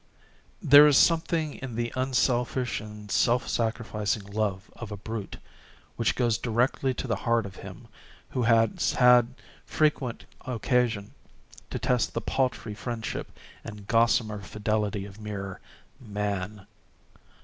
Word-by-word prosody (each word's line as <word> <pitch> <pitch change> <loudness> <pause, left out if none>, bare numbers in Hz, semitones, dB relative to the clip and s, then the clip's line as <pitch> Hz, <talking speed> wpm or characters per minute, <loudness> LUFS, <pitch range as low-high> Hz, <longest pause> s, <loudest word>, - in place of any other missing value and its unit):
There 145 +2 +9
is 145 - +5
something 160 -2 +2
in 130 -4 -6
the 120 0 -2
unselfish 125 -1 0
and 105 -1 -10
self 120 +1 +2
sacrificing 110 -3 -1
love 100 -1 -3
of 120 -3 -8
a 105 - -5
brute, 110 0 -6 0.6
which 115 - 0
goes 120 -3 +1
directly 125 +3 +1
to - - -4
the 115 -5 -1
heart 115 0 +1
of 95 -2 -9
him - - -10 0.4
who 125 - -1
has 115 -4 +3
had 125 0 +5 0.3
frequent 150 -6 0 0.2
occasion 120 -3 0 0.6
to - - -3
test 125 -2 0
the - - -1
paltry 125 -5 -1
friendship 115 +1 -5 0.3
and 105 -3 -9
gossamer 115 -1 +2
fidelity 105 0 -2
of 100 +2 -12
mere 100 -3 -6 0.4
Man. 105 -3 -4
115 Hz, 125 wpm, -27 LUFS, 105-125 Hz, 0.6 s, There